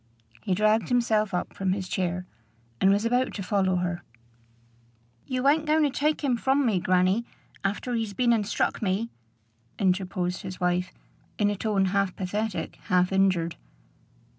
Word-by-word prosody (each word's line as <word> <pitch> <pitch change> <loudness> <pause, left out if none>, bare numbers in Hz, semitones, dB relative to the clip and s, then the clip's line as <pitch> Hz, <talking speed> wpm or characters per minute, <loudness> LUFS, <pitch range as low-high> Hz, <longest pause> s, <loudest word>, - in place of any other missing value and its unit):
He 185 - 0
dragged 215 +2 +2
himself 220 -4 +2
up 180 - -3
from 190 -1 0
his 190 -1 -4
chair, 180 0 -2 0.6
and 190 - +5
was 200 +3 +2
about 245 +2 +1
to 195 - -4
follow 190 0 +1
her. 175 -1 -2 1.3
"You 255 +1 0
ain't 305 +2 +3
going 310 +1 +3
to 290 - +2
take 300 +3 0
him 255 -4 +2
from 270 +3 +2
me, 210 -6 +2
grannie, 185 +5 +2 0.4
after 205 +5 -2
he's 225 -3 -2
been 240 +1 +3
and 210 -3 0
struck - - -1
me?" 210 +3 -1 0.7
interposed 185 -1 0
his 185 -1 -7
wife, 180 +1 0 0.5
in 205 -1 +2
a - - -2
tone 205 -2 +1
half 195 0 0
pathetic, 195 -2 -3
half 180 -2 +2
injured. 185 -4 +2
200 Hz, 160 wpm, -26 LUFS, 185-230 Hz, 1.3 s, and